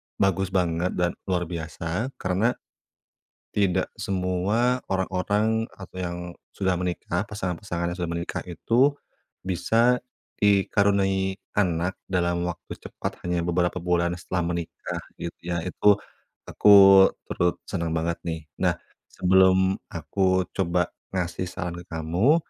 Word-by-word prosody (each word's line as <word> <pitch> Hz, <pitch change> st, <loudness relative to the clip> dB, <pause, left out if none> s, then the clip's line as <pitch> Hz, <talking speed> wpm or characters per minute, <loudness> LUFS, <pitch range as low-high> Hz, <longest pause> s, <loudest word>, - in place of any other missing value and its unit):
bagus 95 Hz, -1 st, +1 dB
banget 90 Hz, -1 st, 0 dB
dan 90 Hz, -1 st, +1 dB, 0.2 s
luar 90 Hz, -2 st, +1 dB
biasa, 85 Hz, +6 st, -3 dB
karena 95 Hz, +6 st, 0 dB, 1.0 s
tidak 95 Hz, -3 st, +2 dB
semua 100 Hz, +7 st, 0 dB
orang-orang 100 Hz, +4 st, +1 dB
atau 95 Hz, -1 st, -12 dB
yang 90 Hz, -1 st, -3 dB, 0.3 s
sudah 95 Hz, -2 st, 0 dB
menikah 90 Hz, 0 st, -2 dB
pasangan-pasangan 90 Hz, -3 st, -3 dB
yang -, -, -12 dB
sudah 85 Hz, -1 st, -2 dB
menikah 85 Hz, +1 st, -3 dB
itu, 125 Hz, -, +3 dB, 0.5 s
bisa 115 Hz, +7 st, +2 dB, 0.3 s
dikaruniai 100 Hz, -1 st, +2 dB, 0.2 s
anak 90 Hz, -2 st, +1 dB
dalam 85 Hz, -1 st, 0 dB
waktu 90 Hz, -1 st, -5 dB
cepat -, -, -7 dB
hanya 90 Hz, -1 st, 0 dB
beberapa 85 Hz, +1 st, 0 dB
bulan 85 Hz, 0 st, +1 dB
setelah 90 Hz, -1 st, -2 dB
menikah 85 Hz, -1 st, -5 dB, 0.2 s
gitu 85 Hz, -, -6 dB
ya, 85 Hz, -1 st, -3 dB
itu 100 Hz, +2 st, +4 dB, 0.5 s
aku 100 Hz, -2 st, +8 dB, 0.2 s
turut 90 Hz, 0 st, 0 dB
senang 85 Hz, -3 st, -2 dB
banget 85 Hz, +1 st, -1 dB
nih. 80 Hz, -1 st, -4 dB, 0.2 s
Nah, -, -, +2 dB, 0.3 s
sebelum 95 Hz, +1 st, +3 dB
aku 95 Hz, -1 st, 0 dB
coba 90 Hz, -2 st, 0 dB, 0.2 s
ngasih 90 Hz, 0 st, -2 dB
saran 85 Hz, 0 st, -5 dB
ke 90 Hz, -, -15 dB
kamu, 85 Hz, -, +2 dB
90 Hz, 120 wpm, -25 LUFS, 85-95 Hz, 1.0 s, aku